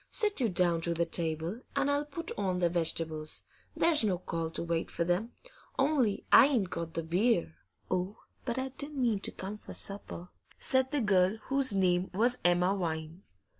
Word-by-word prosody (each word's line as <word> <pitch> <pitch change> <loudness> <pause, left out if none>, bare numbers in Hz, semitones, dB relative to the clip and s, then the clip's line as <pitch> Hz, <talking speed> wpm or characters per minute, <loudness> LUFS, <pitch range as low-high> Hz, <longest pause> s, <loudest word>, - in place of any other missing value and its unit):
Sit 420 -6 +1
you 235 - +2
down 175 -2 +1
to 170 0 -1
the 170 +1 +2
table, 165 +5 -2
and 280 +1 +2
I'll 285 +1 0
put 305 +3 -5
on 190 -3 -1
the 175 -1 +2
vegetables; 160 -2 -1 0.3
there's 320 -6 +3
no 195 -4 +1
call 165 -2 -3
to 165 - -3
wait 170 -1 -1
for - - -1
them. 180 +7 -1 0.4
Only 270 -7 +1
I 275 - +9
ain't 230 -10 0
got 165 -1 -5
the 165 - -2
beer.' 175 - +1 0.4
'Oh, 185 +3 -1 0.3
but 240 -1 -2
I 260 0 -2
didn't 285 +2 -5
mean 230 -5 +2
to - - -2
come 200 +3 -6
for - - -7
supper,' 195 -3 -3 0.3
said 260 0 +1
the 290 -1 0
girl, 195 -1 +3
whose 270 -5 +3
name 185 -1 +2
was 240 +5 +3
Emma 180 +2 +3
Vine. 160 -1 -4
190 Hz, 185 wpm, -31 LUFS, 170-250 Hz, 0.4 s, I